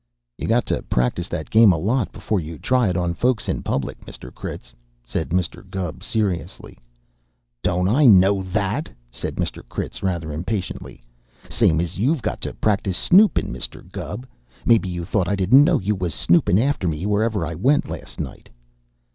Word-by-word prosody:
"You - - -3
got - - +2
to - - -1
practice 60 +9 -1
that 80 -4 -5
game 110 -2 +7
a 85 - +1
lot 115 +9 0
before 105 - -2
you 80 -1 -7
try 125 - +2
it 90 - -1
onto 85 -1 0
folks 120 +5 0
in - - -1
public, 70 - -3
Mr. 60 - -11
Critz," - - -8 0.3
said 80 +6 -3
Mr. 90 -1 -1
Gubb 90 -5 -4
seriously. 95 - -3 0.8
"Don't 90 +4 +1
I 130 +7 +4
know 95 -2 +6
that?" 100 - -2 0.2
said 60 - -5
Mr. - - -3
Critz - - -5
rather 85 -5 -2
impatiently. 90 - -5 0.5
"Same 80 - +3
as 85 +1 -3
you've 135 +4 +1
got - - -3
to - - -4
practice 100 -3 0
snoopin', 200 +4 +4
Mr. - - -7
Gubb. 120 +5 -6 0.4
Maybe 110 -5 +4
you 85 -1 -4
thought 90 +1 0
I 100 - +1
didn't 105 +9 +6
know 165 0 +3
you 100 +2 0
was 90 -6 -3
snoopin' 85 +6 +3
after 125 -5 +1
me 80 +2 -2
wherever 105 -2 +1
I 85 - -4
went 130 - +2
last - - -8
night." - - -7
95 Hz, 175 wpm, -22 LUFS, 85-110 Hz, 0.8 s, game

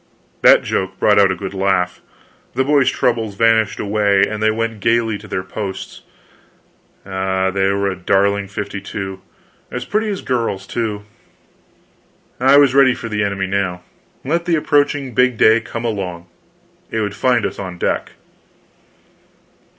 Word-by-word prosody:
That - - +6
joke 95 0 -2
brought 105 +1 +4
out 100 -2 +5
a - - -1
good 95 +2 -6
laugh, 95 -2 0 0.5
the 130 - +2
boys' 140 -1 +3
troubles 115 -4 -1
vanished 115 0 +2
away, 100 -1 +2
and 110 0 -5
they 110 - +3
went 115 0 -2
gaily 115 0 +1
to - - -12
their 95 - -3
posts. 95 +1 -6 1.0
Ah, 95 0 -1
they 95 0 +1
were 100 0 0
a 95 - -2
darling 100 +2 +1
fifty 100 0 -5
two! 95 -2 -6 0.5
As 125 0 -5
pretty 215 +1 -1
as 200 -2 -4
girls, 115 -6 -2
too. 105 -2 -3 1.4
I 135 +3 +5
was 140 -3 +5
ready 135 -2 +5
for 115 - -7
the 105 -1 -1
enemy 100 -1 -1
now. 95 -2 -2 0.4
Let 170 +5 0
the 175 -2 +2
approaching 145 -3 +1
big 125 0 +2
day 110 +1 +5
come 115 +1 -6
along 90 -6 -4 0.6
it 110 - -2
would 100 -1 -2
find 120 +1 +1
us - - -4
on 90 -3 -6
deck. - - -2
105 Hz, 155 wpm, -18 LUFS, 95-120 Hz, 1.4 s, That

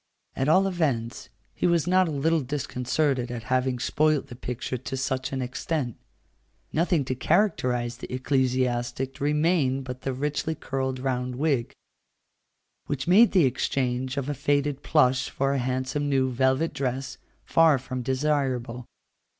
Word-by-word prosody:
At 135 +2 0
all 185 +5 +5
events, 135 -12 -1 0.2
he - - 0
was 170 -3 +2
not 185 0 +3
a - - -2
little 155 +3 +1
disconcerted 130 -1 -1
at 120 -2 -5
having 130 0 +1
spoilt 150 +2 +1
the 120 - -8
picture 125 +1 -4
to 135 +1 -5
such 130 0 -2
an 130 -1 -2
extent. 125 0 -3 0.8
Nothing 165 -3 +1
to 130 - -1
characterize 125 - +1
the - - -9
ecclesiastic 130 -1 0
remained 150 -2 +2
but 125 0 -7
the 135 - -2
richly 150 +4 -2
curled 130 -2 -3
round 125 -1 -2
wig, 135 -3 0 1.1
which 140 0 -3
made 215 +6 +6
the 180 -7 +5
exchange 130 0 -1
of 140 -1 -2
a 145 - -1
faded 145 0 0
plush 130 -5 +2
for 135 +1 0
a 140 - 0
handsome 130 +3 -1
new 130 -2 +2
velvet 130 +5 +1
dress 135 -1 -3 0.3
far 165 -3 +5
from 130 0 -5
desirable. 130 -3 -1
135 Hz, 145 wpm, -26 LUFS, 125-150 Hz, 1.1 s, made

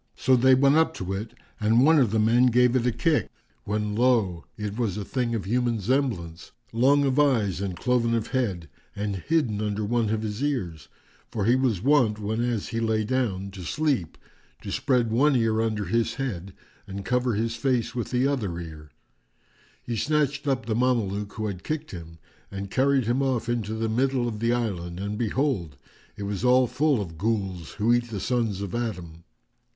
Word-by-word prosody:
So 130 - +3
they 130 +1 +5
went 140 +3 +4
up 160 - +2
to 95 +1 -4
it 105 +3 -5 0.2
and 115 +4 +4
one 160 0 +6
of 125 -6 +3
the 110 - 0
men 115 +4 +4
gave 125 +1 +3
it 125 -1 +2
a - - +3
kick, 120 - +1 0.4
when 105 0 -1
lo! 110 -8 +2
it 105 -1 -4
was 110 -5 -1
a 105 - -4
thing 120 -1 -1
of 100 -5 -3
human 120 +1 0
semblance, 100 -8 -2 0.2
long 135 +5 +4
of 135 +1 +1
eyes 115 -10 +2
and 95 -3 -3
cloven 120 -2 +1
of 115 - -2
head 100 -11 -1 0.3
and 100 -1 -2
hidden 120 - 0
under 105 0 -2
one 115 0 0
of 110 0 -1
his 105 +4 -3
ears, 95 - -2 0.4
for 110 -4 -2
he 120 +3 +4
was 120 -8 0
wont, 130 -6 +3
whenas 110 +1 -2
he 115 - -2
lay 110 -1 +1
down 105 -5 -1
to 95 -1 -9
sleep, 135 - -1 0.5
to - - -5
spread 125 -4 +1
one 140 +5 +3
ear 110 -2 +2
under 110 -2 -1
his 115 +1 0
head, 100 -9 -4 0.3
and 100 0 -6
cover 125 -1 +1
his 115 +2 -1
face 120 -1 0
with 120 -2 -3
the 125 +1 +1
other 115 -12 -1
ear.[FN#402] 80 -3 -9 0.9
He 120 - -3
snatched 145 +1 0
up 130 -4 0
the 110 - -1
Mameluke 105 -5 0
who 110 - -4
had 95 -4 -5
kicked 155 0 -4
him 80 -2 -9 0.3
and 100 0 -6
carried 135 -1 +2
him 120 +4 +1
off 130 -4 0
into 110 -3 -2
the 110 0 -1
middle 125 +2 +1
of 110 -3 -4
the 115 +1 +1
island, 90 -8 -2
and 100 +1 -3
behold, 110 - -1 0.4
it 100 - -5
was 100 +1 -3
all 125 +1 +5
full 145 +1 +1
of 80 -6 -6
Ghuls 95 -5 -2
who 110 +3 +2
eat 120 0 0
the 105 -3 -4
sons 115 -4 -1
of 100 -3 -5
Adam. 90 -9 -4
115 Hz, 195 wpm, -26 LUFS, 100-125 Hz, 0.9 s, one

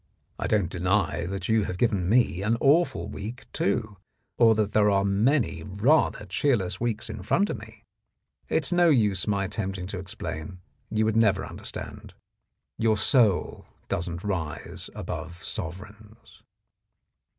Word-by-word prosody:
I - - -1
don't 100 -6 +1
deny 90 -2 0
that 95 -1 -4
you 110 -2 +2
have 90 - -4
given 100 -5 +1
me 115 -5 +3
an 110 +3 +1
awful 140 - +3
week, 110 +6 -7
too, 105 +1 -1 0.4
or 115 -2 +5
that 105 -1 0
there 105 0 +4
are 100 -1 +2
many 110 +7 +2
rather 105 +4 +2
cheerless 95 -2 0
weeks 115 -2 -1
in 105 - -6
front 195 - +1
of - - -4
me. - - -14 0.7
It's - - +1
no 175 -1 +5
use 105 - +2
my 100 -2 +1
attempting 95 -2 -3
to 95 0 -5
explain; 90 -2 -6 0.3
you 110 0 +1
would 110 0 +1
never 100 -4 +3
understand. - - -8 0.6
Your 110 -1 +3
soul 105 -3 +2 0.2
doesn't 85 0 -3
rise 90 -7 -4
above 85 +2 -6
sovereigns." 105 +4 -8
105 Hz, 140 wpm, -26 LUFS, 95-115 Hz, 0.7 s, or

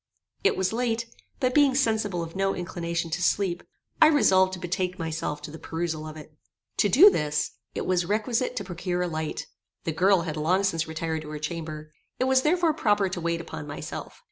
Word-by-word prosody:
It 405 - +3
was 190 +2 0
late; 235 -1 0 0.3
but 255 -1 +1
being 285 -2 +5
sensible 220 -8 +1
of 165 +1 -8
no 195 0 +1
inclination 170 -2 -3
to 170 +3 -2
sleep, 180 -1 +1 0.4
I 315 - +10
resolved 190 -11 +4
to 185 - -5
betake 180 +1 -2
myself 160 -2 -3
to 150 - -7
the 160 - -9
perusal 160 -2 -3
of 155 0 -8
it. 155 0 -12 0.4
To 205 - +3
do 360 - +8
this 150 - 0 0.2
it - - -2
was 180 -1 +2
requisite 230 +5 0
to 215 - -2
procure 180 -1 -2
a - - -1
light. 155 -2 -3 0.4
The 165 - -1
girl 185 +3 +4
had 160 -2 -4
long 180 +6 +2
since 165 -4 0
retired 160 0 -3
to 150 - -9
her 155 - -5
chamber: 155 -1 -5 0.3
it - - +2
was 260 0 +4
therefore 330 +2 +3
proper 205 -9 +2
to 180 -1 -4
wait 170 0 -1
upon 155 -3 -7
myself. 145 - -7
180 Hz, 200 wpm, -26 LUFS, 160-210 Hz, 0.4 s, I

